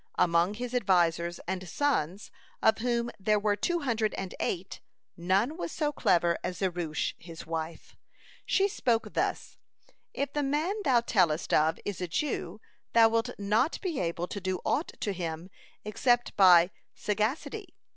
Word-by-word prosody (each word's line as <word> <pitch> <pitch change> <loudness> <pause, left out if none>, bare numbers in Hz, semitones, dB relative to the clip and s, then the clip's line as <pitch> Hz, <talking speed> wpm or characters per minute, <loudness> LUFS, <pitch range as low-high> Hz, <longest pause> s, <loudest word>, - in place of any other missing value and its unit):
(157) 170 - +2
Among 170 +4 +3
his 245 +2 -5
advisers 175 -6 +2
and 185 -1 -4
sons, 205 - -1 0.3
of 220 0 +3
whom 235 0 0
there 210 +2 +2
were 205 0 +1
two 345 - -1
hundred 230 -5 0
and 190 -1 -5
eight, 180 +1 -3 0.3
none 195 - +1
was 345 - -4
so 300 -2 -1
clever 170 - +2
as 180 - -3
Zeresh 175 -5 -2
his 165 -1 -10
wife. 160 0 -5 0.5
She 390 +1 +2
spoke 240 - -1
thus: - - -2 0.5
"If 280 0 -3
the 295 - 0
man 295 +7 0
thou 250 -4 +4
tellest 175 -9 +1
of 155 +1 +3
is 200 -2 -4
a 180 - -2
Jew, 200 - -2 0.3
thou 230 -1 +7
wilt 225 0 0
not 215 +9 +1
be 345 -7 -2
able 170 0 -2
to 200 - -5
do 185 0 -2
aught 305 - 0
to 205 - -1
him 170 0 -5 0.3
except 240 +3 +1
by 180 -2 +7 0.2
sagacity. 215 +7 -2
205 Hz, 155 wpm, -29 LUFS, 175-245 Hz, 0.5 s, thou